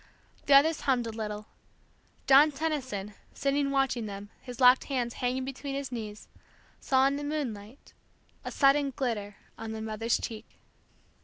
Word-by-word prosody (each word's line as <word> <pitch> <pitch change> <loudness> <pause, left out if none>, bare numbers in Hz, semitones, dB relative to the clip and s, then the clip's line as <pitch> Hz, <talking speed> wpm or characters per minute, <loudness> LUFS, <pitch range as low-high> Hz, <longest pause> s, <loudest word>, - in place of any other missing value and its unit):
The 280 - +7
others 310 +3 +5
hummed 255 -3 +1
a 225 - -4
little. 210 -1 -5 0.8
John 280 +3 +7
Tenison, 265 -10 -3 0.2
sitting 280 0 0
watching 270 -5 0
them, 200 +1 -8
his 250 -1 -9
locked 250 0 +6
hands 245 -4 -2
hanging 255 +1 -2
between 275 +1 -5
his 275 -2 -4
knees, 215 -3 -6 0.5
saw 265 0 +3
in 275 +1 +1
the 290 - -5
moonlight 260 -6 -5 0.5
a - - -4
sudden 275 0 +3
glitter 210 -6 -3 0.2
on 220 0 -5
the 220 - -5
mother's 220 +1 -1
cheek. 220 0 -8
255 Hz, 150 wpm, -29 LUFS, 220-275 Hz, 0.8 s, The